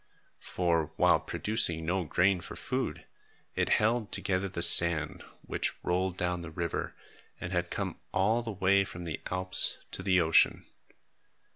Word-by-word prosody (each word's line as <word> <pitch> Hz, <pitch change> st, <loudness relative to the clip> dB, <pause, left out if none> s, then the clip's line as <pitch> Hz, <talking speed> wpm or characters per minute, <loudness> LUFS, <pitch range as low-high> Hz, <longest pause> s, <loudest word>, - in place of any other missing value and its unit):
For, 85 Hz, -3 st, -3 dB
while -, -, +2 dB
producing 85 Hz, -7 st, 0 dB
no 90 Hz, +1 st, -3 dB
grain 90 Hz, +4 st, 0 dB
for -, -, -11 dB
food, -, -, -5 dB, 0.5 s
it -, -, -2 dB
held 110 Hz, 0 st, -1 dB
together 95 Hz, 0 st, -3 dB
the 85 Hz, -2 st, -1 dB
sand, 85 Hz, -2 st, +8 dB, 0.2 s
which -, -, -4 dB
rolled 90 Hz, +1 st, -3 dB
down 90 Hz, 0 st, -3 dB
the 85 Hz, -, -9 dB
river 85 Hz, +1 st, -6 dB, 0.4 s
and 90 Hz, -, -8 dB
had 85 Hz, 0 st, -3 dB
come -, -, -6 dB
all 110 Hz, +5 st, 0 dB
the 115 Hz, -1 st, -7 dB
way 100 Hz, 0 st, +1 dB
from 90 Hz, -2 st, -10 dB
the 80 Hz, -3 st, -7 dB
Alps 90 Hz, 0 st, 0 dB
to -, -, -5 dB
the 95 Hz, -1 st, +1 dB
ocean. 80 Hz, -1 st, +1 dB
90 Hz, 150 wpm, -28 LUFS, 85-95 Hz, 0.5 s, sand